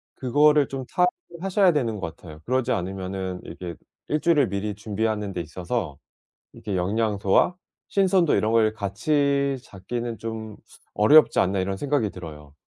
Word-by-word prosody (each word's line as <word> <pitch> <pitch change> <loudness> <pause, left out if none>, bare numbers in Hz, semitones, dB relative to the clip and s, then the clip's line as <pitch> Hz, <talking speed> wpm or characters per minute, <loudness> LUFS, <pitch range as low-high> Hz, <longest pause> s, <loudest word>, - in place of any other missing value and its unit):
그거를 145 +2 +4
좀 135 -1 -5
타협을 180 - -1
하셔야 195 -1 +4
되는 115 -8 -1
것 85 - -5
같아요. 80 -3 -12
그러지 130 0 0
않으면은 95 -1 -3
이게 85 -3 -7 0.3
1 150 - 0
주일을 150 - +3
미리 100 +1 -2
준비하는 105 -1 -2
데 90 - -3
있어서 85 - -4 0.6
이게 100 -3 -5
'영양소와 100 - +1 0.3
신선도 190 -4 +3
이런 110 +1 +1
걸 110 -1 +3
같이 140 +7 0
잡기는 115 +4 -5
좀 110 -1 -6 0.4
어렵지 150 +9 +6
않나.' 95 0 +1
이런 95 +1 -2
생각이 135 -5 0
들어요. 75 -5 -10
110 Hz, 325 characters per minute, -24 LUFS, 95-140 Hz, 0.6 s, 어렵지